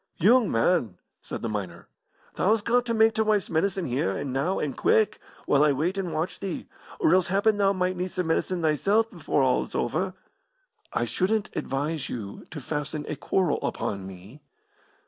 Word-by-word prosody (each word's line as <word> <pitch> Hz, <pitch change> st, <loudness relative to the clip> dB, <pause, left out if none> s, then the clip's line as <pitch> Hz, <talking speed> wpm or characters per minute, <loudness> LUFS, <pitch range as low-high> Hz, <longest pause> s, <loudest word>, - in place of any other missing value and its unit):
"Yoong 230 Hz, +4 st, +5 dB
man," 115 Hz, -, +1 dB, 0.2 s
said -, -, -6 dB
the -, -, 0 dB
miner, 100 Hz, -6 st, -5 dB, 0.5 s
"thou's 210 Hz, +2 st, +2 dB
got 245 Hz, +2 st, +2 dB
to -, -, 0 dB
mak' 220 Hz, 0 st, +4 dB
t' 220 Hz, -, 0 dB
wife's 215 Hz, -4 st, +1 dB
medicine 185 Hz, +3 st, 0 dB
here, 120 Hz, -6 st, -1 dB
and 135 Hz, -, -4 dB
now, 150 Hz, +8 st, 0 dB
and 140 Hz, -4 st, -2 dB
quick, 220 Hz, -1 st, +2 dB, 0.3 s
while 145 Hz, 0 st, +4 dB
I 150 Hz, -1 st, +4 dB
wait 165 Hz, +8 st, 0 dB
and 190 Hz, -3 st, -3 dB
watch 155 Hz, +3 st, -2 dB
thee, 195 Hz, -4 st, -5 dB, 0.3 s
or 160 Hz, -, +4 dB
else 185 Hz, -1 st, +4 dB
happen 200 Hz, +3 st, +2 dB
thou 200 Hz, -1 st, +3 dB
might 185 Hz, -1 st, 0 dB
need 180 Hz, 0 st, -3 dB
some 180 Hz, -, -2 dB
medicine 170 Hz, +2 st, 0 dB
thysel' 195 Hz, +8 st, +3 dB
before 170 Hz, -9 st, -1 dB
all 130 Hz, -1 st, +3 dB
is -, -, -7 dB
over." 185 Hz, +9 st, -1 dB, 0.8 s
"I -, -, 0 dB
shouldn't 205 Hz, +3 st, -1 dB
advise 145 Hz, +2 st, -2 dB
you 105 Hz, -5 st, -6 dB
to 160 Hz, -, -7 dB
fasten 150 Hz, +2 st, -4 dB
a 155 Hz, -, -3 dB
quarrel 175 Hz, +3 st, 0 dB
upon 100 Hz, -2 st, -3 dB
me." 95 Hz, +10 st, -12 dB
170 Hz, 185 wpm, -26 LUFS, 140-195 Hz, 0.8 s, Yoong